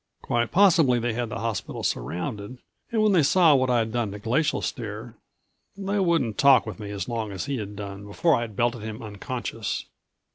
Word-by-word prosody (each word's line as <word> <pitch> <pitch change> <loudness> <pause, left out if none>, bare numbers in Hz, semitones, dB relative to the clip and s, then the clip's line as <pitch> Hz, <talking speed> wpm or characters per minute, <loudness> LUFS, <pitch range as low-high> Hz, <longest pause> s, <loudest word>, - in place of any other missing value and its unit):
Quite 120 -1 0
possibly 165 -10 +5
they 120 0 -1
had 120 0 -2
the - - -4
hospital 115 -4 -3
surrounded 100 - -3 0.3
and 220 -2 +2
when 215 - +4
they 180 -4 +5
saw 165 +2 +5
what 130 -2 +2
I'd 115 -3 +1
done 120 -2 -1
to - - -6
Glacial 125 +9 0
Stare 115 -1 -5 0.6
they 200 +1 -1
wouldn't 165 - +1
talk 135 -3 +6
with 110 -3 -7
me 105 -1 -6
as 100 -2 -4
long 115 -3 -3
as 95 -2 -4
he 140 -1 -2
had 105 -2 -6
done 100 0 -7
before 160 +11 +2
I'd 115 -5 -1
belted 120 0 0
him 110 +1 -6
unconscious. 110 -1 -4
115 Hz, 190 wpm, -25 LUFS, 105-140 Hz, 0.6 s, talk